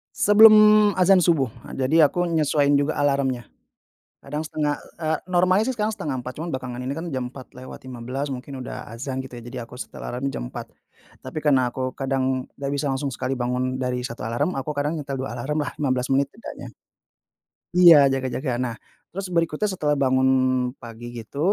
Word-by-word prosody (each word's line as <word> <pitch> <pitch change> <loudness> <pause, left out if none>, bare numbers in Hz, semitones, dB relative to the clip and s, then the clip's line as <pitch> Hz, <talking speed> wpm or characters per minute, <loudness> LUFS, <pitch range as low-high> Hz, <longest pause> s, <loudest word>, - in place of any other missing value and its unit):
Sebelum 215 0 +7
azan 185 0 +5
subuh, 155 -6 +3 0.2
eee, 130 -1 -1
jadi 155 +5 +2
aku 175 +2 0
nyesuaiin 150 -3 +2
juga 145 +2 +1
alarmnya. 140 -4 0 0.8
Kadang 150 +3 -4
setengah, 150 -1 -1 0.2
eee, 160 -1 0
normalnya 185 +3 +3
sih 260 - 0
sekarang 215 -1 -1
03.30 130 - -5
cuma 165 +1 -4
belakangan 125 -1 -5
ini 130 - -3
kan 165 +3 -5
jam 130 -3 -3
04.15 130 0 -7
mungkin 130 +1 -6
udah 125 0 -6
azan 130 +2 -5
gitu 125 -2 -9
jadi 120 +1 -7
aku 125 +1 -12
setel - - -8
alarm 125 +3 -3
jam - - -6
04.00. - - -7 0.6
Tapi 130 +4 -5
karena 130 -5 +3
aku 130 0 -4
kadang 130 -1 -1
nggak 140 0 -3
bisa 145 +1 -2
langsung 135 +1 -2
sekali 130 +1 -3
bangun 130 +1 -2
dari 125 -1 -2
1 120 -1 -6
alarm, 120 +10 -1
aku 135 - -5
kadang 145 +2 -1
nyetel 140 -1 -4
2 125 - -5
alarmlah, 150 +3 -2
15 130 -2 0
menit 140 +1 +3
tidaknya. 230 - -10 1.1
Iya 160 -6 +8
jaga-jaga, 130 +1 -2
nah 125 -2 -2 0.4
terus 195 0 -4
berikutnya 170 +4 0
setelah 150 -5 0
bangun 130 -1 +2 0.5
pagi 115 0 -9
gitu, 115 +3 -8
135 Hz, 170 wpm, -23 LUFS, 130-155 Hz, 1.1 s, Iya